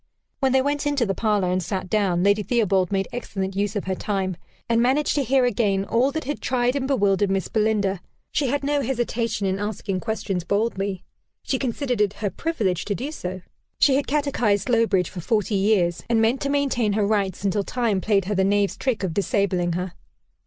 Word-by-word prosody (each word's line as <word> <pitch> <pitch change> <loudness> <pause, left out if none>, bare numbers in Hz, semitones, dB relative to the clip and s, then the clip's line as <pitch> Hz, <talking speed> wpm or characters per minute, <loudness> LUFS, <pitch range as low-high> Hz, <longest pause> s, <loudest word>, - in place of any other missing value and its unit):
When 265 -1 +2
they 260 0 +3
went 290 +1 -1
into 285 -4 +1
the 195 - 0
parlor, 205 -3 +1
and 185 +1 +1
sat 185 +1 -3
down, 185 -3 +1
Lady 200 +1 +3
Theobald 200 -5 +1
made 195 -1 0
excellent 195 -5 -4
use 205 +1 -1
of 205 - -1
her 190 - -2
time, 190 -1 -2 0.3
and 230 0 +2
managed 265 +5 +2
to 285 - +1
hear 265 0 +3
again 200 -4 +1
all 245 +6 +2
that 315 - -2
had 290 +3 -4
tried 250 0 +1
and 265 -2 -1
bewildered 205 -6 +2
Miss 195 -1 -1
Belinda. 210 -4 +1 0.3
She 285 - +1
had 285 +3 -1
no 290 0 +1
hesitation 235 -4 -1
in 190 0 0
asking 205 -2 -3
questions 200 -4 -2
boldly; 200 -1 -1 0.4
she 265 - -1
considered 250 -2 -1
it 205 -2 +2
her 205 -2 -3
privilege 205 - -1
to 205 - -1
do 275 +8 -4
so: 185 - -5 0.4
she 275 - +4
had 280 - 0
catechised 260 -9 +1
Slowbridge 225 -7 +2
for 180 - -6
forty 215 +2 0
years, 195 -4 +2
and 230 -1 +3
meant 225 +4 +2
to 280 - -1
maintain 270 -7 +1
her 210 0 +1
rights 200 -3 0
until 200 +1 +1
Time 225 -4 0
played 200 -3 +2
her 210 - -1
the 190 -1 +2
knave's 200 0 +1
trick 250 -6 -1
of 180 -4 -1
disabling 190 -3 0
her. 180 +1 -3
210 Hz, 200 wpm, -23 LUFS, 195-245 Hz, 0.4 s, she